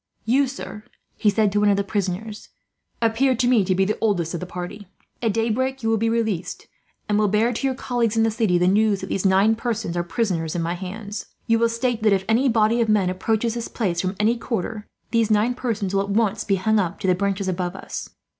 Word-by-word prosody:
"You, 265 +5 +3
sir," 245 -5 -8 0.3
he 215 - +2
said 205 0 +2
to 205 - +1
one 210 0 +4
of 200 - +3
the 200 - +1
prisoners, 205 +1 -4 0.5
"appear 245 +4 +2
to 245 +1 +1
me 240 -5 +4
to 185 0 +1
be 190 +1 +2
the 210 - -2
oldest 180 -7 0
of 170 - -3
the 180 - -6
party. 180 +3 -7 0.3
At 225 -2 +1
daybreak 240 +4 -1
you 225 - +1
will 225 - +3
be 225 +1 +1
released; 220 -6 -2 0.4
and 210 0 +2
will 210 - +3
bear, 215 +4 +2
to 270 +4 -1
your 260 - -1
colleagues 235 -4 -1
in 225 - +4
the 225 - +2
city, 215 -5 +1
the 180 +1 +2
news 205 +1 +3
that 190 - -6
these 195 0 +1
nine 195 +4 +4
persons 225 -6 -3
are 175 - +1
prisoners 175 -4 -2
in 170 - 0
my 170 +1 -1
hands. 200 +3 -6 0.2
You 230 0 +2
will 230 0 +3
state 230 0 -1
that, 215 -2 +4
if 190 -1 0
any 240 +5 +3
body 225 +1 +3
of 225 - +1
men 200 -4 +3
approaches 220 +4 0
this 235 -1 -4
place 180 -7 -1
from 185 +1 -2
any 225 +3 +2
quarter, 220 -2 -4 0.2
these 230 -2 +2
nine 215 +3 +3
persons 220 -6 -3
will 195 - +2
at 200 - -4
once 215 0 +1
be 200 - +1
hung 215 +3 +2
up 185 -1 -2
to - - -3
the 185 - +4
branches 195 +1 -1
above 180 0 -2
us. - - -6
215 Hz, 240 wpm, -23 LUFS, 190-230 Hz, 0.5 s, one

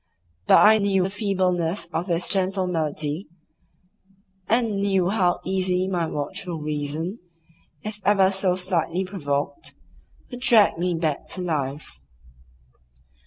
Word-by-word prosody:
But - - +7
I 220 +1 +6
knew 195 -2 +2
the 190 - -2
feebleness 185 -4 -1
of 170 +4 -2
this 170 -1 +1
gentle 190 -1 +1
malady, 155 0 -2 1.2
and 230 -3 +1
knew 195 -3 +1
how 185 -4 +1
easily 185 -1 0
my 175 -3 -1
watchful 160 +4 -4
reason, 150 +6 -4 0.6
if 210 0 -6
ever 195 -2 +4
so 190 -2 +1
slightly 180 -1 +1
provoked, 150 - -3 0.6
would 245 - -7
drag 220 -8 +5
me 180 0 0
back 160 -3 -2
to 185 - -4
life. 145 - -4
185 Hz, 120 wpm, -23 LUFS, 165-195 Hz, 1.2 s, But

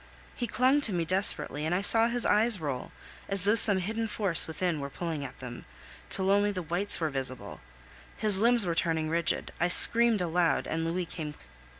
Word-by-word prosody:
He 240 - -4
clung 260 +5 +1
to 225 -8 0
me 170 -2 -2
desperately, 180 -5 -1
and 160 +3 -1
I 185 - -1
saw 225 +3 +4
his 240 0 0
eyes 215 0 +2
roll, 140 -5 -6 0.4
as 195 -2 +1
though 205 +2 +3
some 215 -3 +7
hidden 220 +5 -4
force 200 -5 +2
within 165 0 -3
were 140 0 -6
pulling 160 0 -6
at 135 - -10
them, 120 -2 -10 0.4
till 190 0 0
only 205 +1 +1
the 185 -3 -6
whites 175 +5 -2
were 160 -2 -2
visible; 130 -2 -7 0.6
his 210 -3 +3
limbs 235 -1 +4
were 170 - -2
turning 160 -2 -1
rigid. 170 0 -2
I 175 - +1
screamed 230 +5 +4
aloud, 170 -1 -1
and 165 0 -4
Louis 175 +2 -3
came. 155 -3 -8
180 Hz, 195 wpm, -27 LUFS, 160-210 Hz, 0.6 s, some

